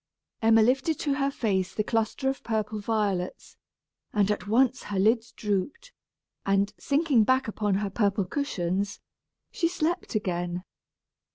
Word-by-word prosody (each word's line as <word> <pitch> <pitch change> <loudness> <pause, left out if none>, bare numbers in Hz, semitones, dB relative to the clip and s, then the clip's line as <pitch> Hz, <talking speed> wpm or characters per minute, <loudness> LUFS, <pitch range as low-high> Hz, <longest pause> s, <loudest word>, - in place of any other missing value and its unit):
Emma 225 0 +6
lifted 270 +6 +2
to 285 - 0
her 275 0 +1
face 195 -9 -1
the 215 - +1
cluster 225 +4 -1
of 270 0 -1
purple 215 -1 -2
violets, 205 -4 -2 0.6
and 205 -1 +3
at 210 - -3
once 255 +4 +2
her 205 - -3
lids 225 +4 +2
drooped; 210 - -3 0.5
and, 195 +1 +1
sinking 280 -5 +3
back 260 +3 +2
upon 210 -2 0
her 200 0 -1
purple 200 -1 +1
cushions, 200 - -2 0.5
she 335 - +1
slept 340 -4 -2
again. 175 -3 -2
215 Hz, 135 wpm, -27 LUFS, 200-265 Hz, 0.6 s, Emma